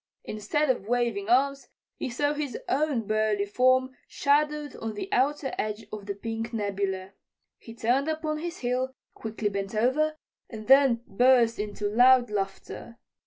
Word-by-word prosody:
Instead 260 +8 0
of 210 -5 -5
waving 235 -4 0
arms, 275 +3 +2 0.3
he - - -4
saw 290 +5 0
his 290 -5 -4
own 275 -5 0
burly 215 -1 +1
form 255 +4 +2 0.2
shadowed 295 +1 0
on 225 -1 -5
the 210 - -4
outer 280 +1 +1
edge 215 +1 -3
of 205 -2 -7
the 200 - -3
pink 225 +2 -5
nebula. 195 -3 -2 0.5
He 230 - -12
turned 250 +5 +1
upon 310 -1 -2
his 345 +2 -5
heel, 255 +1 -1 0.2
quickly 220 -1 -3
bent 195 +1 -4
over, 300 +8 +1 0.3
and 215 -2 -8
then 265 -2 +5
burst 240 0 +3
into 210 0 -3
loud 245 +2 +5
laughter. 200 +3 -5
240 Hz, 150 wpm, -27 LUFS, 210-275 Hz, 0.5 s, then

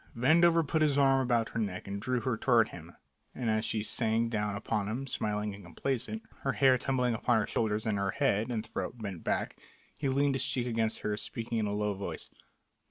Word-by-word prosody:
Vandover 165 +5 +4
put 160 +2 +1
his 145 -2 +3
arm 135 -1 +4
about 120 -3 +1
her 115 - -3
neck 100 -4 -3
and 100 +1 -4
drew 125 +1 0
her 130 -2 0
toward 115 0 +3
him, 85 0 -11 0.4
and 120 -3 -1
as 110 0 +1
she 110 -1 -1
sank 115 +1 +1
down 105 -2 -1
upon 100 0 -2
him, 120 +6 -3
smiling 105 -4 -2
and 100 0 -11
complaisant, 135 - -3 0.2
her 135 - -1
hair 130 -2 +5
tumbling 125 -3 +1
upon 115 +1 +2
her 105 - 0
shoulders 110 -1 -1
and 105 -2 0
her 100 0 0
head 115 -3 +1
and 115 -2 -2
throat 115 - -4
bent 100 -7 -6
back, - - -1 0.4
he 140 - -1
leaned 140 +1 +2
his 135 - +1
cheek 125 -2 -1
against 115 -2 -1
hers, 105 0 -2
speaking 115 0 -3
in 105 - 0
a - - -2
low 105 0 0
voice. 100 0 -6
115 Hz, 215 wpm, -31 LUFS, 105-130 Hz, 0.4 s, hair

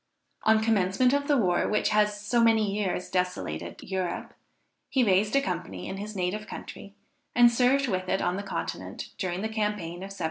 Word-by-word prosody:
On 220 0 +4
commencement 220 +3 +3
of 285 0 +1
the 290 -2 +4
war 180 -7 +2
which 210 - +1
has 210 -1 +2
so 230 +3 +2
many 220 -3 +3
years 190 -3 -1
desolated 135 - -3
Europe, 185 -2 -3 0.6
he 260 - +2
raised 205 +2 +3
a 275 - +5
company 95 - -4
in 190 - -5
his 210 +1 -6
native 195 +3 -2
country, 200 0 -9 0.4
and 240 -1 +7
served 255 +3 +3
with 185 -4 -2
it 190 - +1
on 180 - 0
the 200 - -3
Continent 195 -1 -5
during 185 0 -2
the - - 0
campaign 210 -6 -2
of 190 +2 -7
1794. 195 0 -10
205 Hz, 185 wpm, -27 LUFS, 185-220 Hz, 0.6 s, and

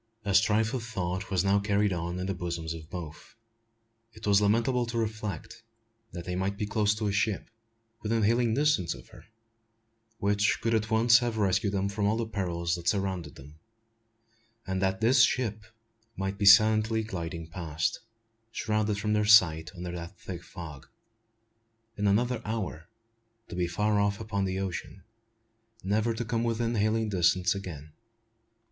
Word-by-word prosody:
A 100 - 0
strife 105 +4 +3
of 130 - -2
thought 95 -4 -3
was 95 -2 +1
now 100 +1 +3
carried 100 -1 +1
on 85 +1 -3
in 90 - -3
the 95 - -1
bosoms 85 -2 -4
of 80 -1 -10
both. 80 -3 -8 0.8
It 110 - -10
was 100 0 +4
lamentable 120 +4 +2
to 115 0 -4
reflect, 110 -3 -4 0.5
that 85 -1 -7
they 90 - -3
might 95 +2 -2
be 105 - -2
close 105 0 +1
to 105 0 -2
a - - 0
ship, 105 +1 -1 0.5
within 110 +1 0
hailing 115 +1 +2
distance 135 - +1
of - - -14
her, - - -15 0.9
which 100 +1 +1
could 115 +1 0
at 110 0 0
once 115 +1 +5
have 120 -2 -2
rescued 100 0 +1
them 100 0 0
from 100 0 -1
all 110 +2 +1
the 115 - -1
perils 85 -5 -2
that 85 0 -4
surrounded 95 -3 -1
them; 75 +3 -14 1.1
and 95 0 -2
that 95 +1 0
this 125 +3 +5
ship 110 -4 +1 0.5
might 95 +1 -3
be 100 - +2
silently 110 +2 +6
gliding 85 -5 -5
past, 80 -2 -2 0.5
shrouded 110 -2 -1
from 105 +1 -1
their 105 0 +2
sight 85 -7 +5
under 90 0 -5
that 85 +1 -7
thick 90 -2 -7
fog, 80 -6 -10 1.1
in 105 -1 0
another 120 +5 +1
hour 100 -7 -4 0.6
to 95 - -7
be 90 -1 0
far 105 +4 +1
off 100 0 +1
upon 105 -3 -2
the 95 0 -2
ocean, 95 0 -5 0.8
never 110 +4 0
to 120 +1 -3
come 115 0 -1
within 115 0 0
hailing 110 +1 +1
distance 90 -2 +2
again! 80 -6 -8
100 Hz, 165 wpm, -28 LUFS, 90-110 Hz, 1.1 s, silently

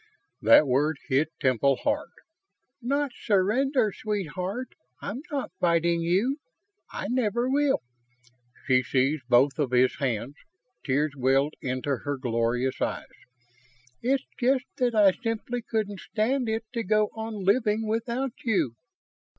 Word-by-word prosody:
That - - +7
word 145 +4 +1
hit 145 +4 +2
Temple 135 +1 +3
hard. - - 0 0.7
"Not 280 +3 0
surrender, 220 +4 +1
sweetheart. 200 +3 -3 0.3
I'm 240 +6 -5
not 280 -9 -3
fighting 170 -1 +2
you. 195 - +1 0.5
I - - -4
never 240 -1 0
will." 275 - +2 0.8
She 130 -2 +4
seized 130 +2 0
both 135 +4 +4
of 145 -4 +1
his 125 +1 +3
hands; 125 -1 -2 0.5
tears 145 +2 +1
welled 135 +3 +2
into 130 +1 -2
her 145 +3 -4
glorious 120 +1 -1
eyes. - - -2 1.0
"It's 265 +2 +1
just 255 +1 +2
that 245 -2 +1
I 205 -3 +6
simply 230 +3 -3
couldn't 215 -4 -3
stand 235 +4 -1
it 220 +1 -1
to 235 - -1
go 215 +1 +2
on 225 0 -5
living 215 +2 +2
without 235 +3 -1
you!" 205 - +1
200 Hz, 125 wpm, -27 LUFS, -, 1.0 s, That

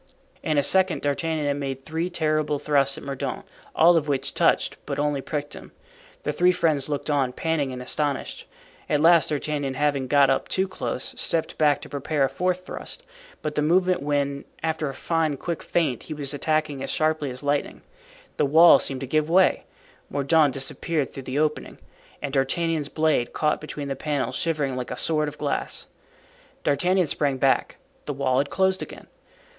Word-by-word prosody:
In 155 -2 0
a 145 - +4
second 190 +2 +2
D'Artagnan 155 +2 -1
had 145 0 0
made 135 -1 -5
three 165 +3 -2
terrible 155 -3 0
thrusts 140 -2 +2
at - - -9
Mordaunt, 140 -1 -4 0.3
all 170 +2 +6
of 150 -2 0
which 140 -2 -1
touched, - - +2
but - - -3
only 145 -1 0
pricked 145 +1 -4
him. - - -11 0.5
The - - 0
three 180 +1 +4
friends 155 -6 +1
looked 145 +1 -2
on, 135 -3 +1
panting 160 -4 -1
and 125 0 -6
astonished. 145 +1 -2 0.4
At 150 - +2
last 165 +1 +5
D'Artagnan, 145 -2 -2
having 140 -2 0
got 140 0 +5
up 135 - 0
too 190 +1 0
close, 185 -7 -4
stepped 165 -1 -1
back 150 -2 +3
to - - -10
prepare 145 +1 -1
a 135 - +2
fourth 180 0 -1
thrust, - - -7 0.4
but 150 - -2
the 150 - 0
moment 180 +3 +2
when, 140 -1 -1 0.2
after 160 -2 -1
a 135 - -7
fine, 160 -1 0
quick 170 +4 -4
feint, 150 -9 0
he 155 - -7
was 145 -1 -3
attacking 155 -1 -1
as - - -4
sharply 155 -2 0
as 125 +2 -6
lightning, 145 0 -1 0.5
the 150 - +3
wall 160 +1 +8
seemed 135 -1 -2
to - - -3
give 155 +3 0
way, 185 +3 +4 0.4
Mordaunt 145 +1 +3
disappeared 140 +2 -2
through 135 - -7
the 130 - -2
opening, 150 0 -1 0.5
and 140 -2 -3
D'Artagnan's 150 +2 0
blade, 155 -6 +1
caught 150 -1 0
between 150 -2 -6
the 135 - -2
panels, 135 -3 -2
shivered 150 -4 0
like 125 -1 -4
a 125 - -5
sword 155 -2 +1
of 150 0 -7
glass. 145 -2 -2 0.8
D'Artagnan 180 +6 +2
sprang 140 -2 0
back; 135 +1 +1 0.3
the 145 - -1
wall 130 -1 +1
had 140 +1 0
closed 190 0 +1
again. - - -8
150 Hz, 185 wpm, -24 LUFS, 140-160 Hz, 0.8 s, wall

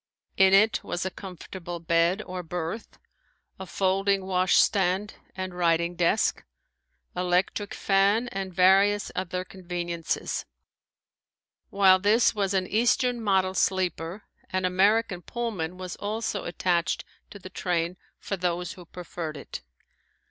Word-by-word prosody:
In 190 0 +5
it 215 +3 +4
was 175 - -3
a 190 - -2
comfortable 180 -2 -8
bed, 170 +4 +2
or 185 0 -5
berth, 175 +5 -5 0.6
a 190 - -7
folding 195 +1 +1
washstand 190 +1 +2 0.2
and 185 -1 -4
writing 170 0 +1
desk, 175 +5 +1 0.7
electric 180 +3 0
fan, 200 +4 +2
and 195 -2 -4
various 195 +3 +4
other 185 0 -3
conveniences. 175 -3 -4 1.2
While 190 -1 +5
this 210 +5 +4
was 200 -2 -1
an 185 -1 +1
eastern 240 +3 +1
model 190 -3 +2
sleeper, 185 0 -1 0.3
an 185 0 -1
American 195 +1 +2
pullman 185 -6 -4
was 185 -1 -6
also 210 0 -3
attached 175 0 0 0.2
to - - -10
the 185 -1 -11
train 175 -1 -1 0.2
for 195 - -4
those 180 0 -2
who 180 -4 -12
preferred 170 -3 -6
it. 140 - -8
185 Hz, 120 wpm, -26 LUFS, 175-200 Hz, 1.2 s, In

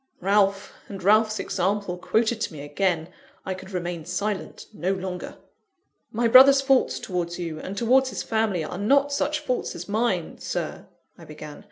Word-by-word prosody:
Ralph, 200 +1 +1
and 195 -2 -8
Ralph's 215 +2 +4
example 195 0 -1
quoted 220 +5 0
to 185 - -2
me 145 - -8
again! 160 +2 -1 0.4
I 190 - -2
could 190 0 -10
remain 175 -3 -4
silent 190 +4 -4
no 190 -1 -1
longer. 185 -1 -6 0.7
"My 235 +2 +1
brother's 270 +3 +8
faults 270 -1 +2
towards 175 -2 -3
you, 165 -3 -5
and 195 +5 -7
towards 260 +4 +3
his - - -4
family, 220 -6 0
are 175 +4 -6
not 280 +7 +3
such 300 +2 -1
faults 255 -4 -2
as 175 - -7
mine, 205 -5 -1
Sir," - - -4 0.3
I - - -12
began. 150 -1 -10
195 Hz, 165 wpm, -25 LUFS, 175-225 Hz, 0.7 s, brother's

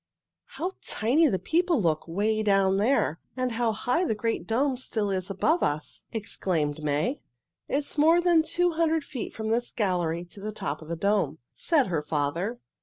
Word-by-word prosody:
"How 365 +3 -3
tiny 275 +9 +2
the 195 - +1
people 335 - +1
look 165 -5 0
'way 210 +6 0
down 195 -2 +3
there! 210 - +2 0.2
And 255 -1 0
how 230 0 +1
high 245 - 0
the 220 - 0
great 225 +2 -2
dome 260 +4 +1
still 220 -5 -2
is 185 -1 -2
above 305 - +1
us!" 150 +1 -2
exclaimed 165 -9 -1
May. 150 - 0 0.5
"It - - -1
is 290 +1 -3
more 325 +3 +6
than 345 -2 +4
two 350 +2 +1
hundred 325 -1 +1
feet 265 -5 -6
from 220 0 -3
this 240 +2 0
gallery 175 -5 -1
to - - -9
the 210 +2 -4
top 155 -8 -4
of 155 - -11
the 170 - -3
dome," 195 -5 +1 0.2
said 305 -6 +2
her 170 -7 -1
father. 160 +10 -2
215 Hz, 180 wpm, -27 LUFS, 175-280 Hz, 0.5 s, more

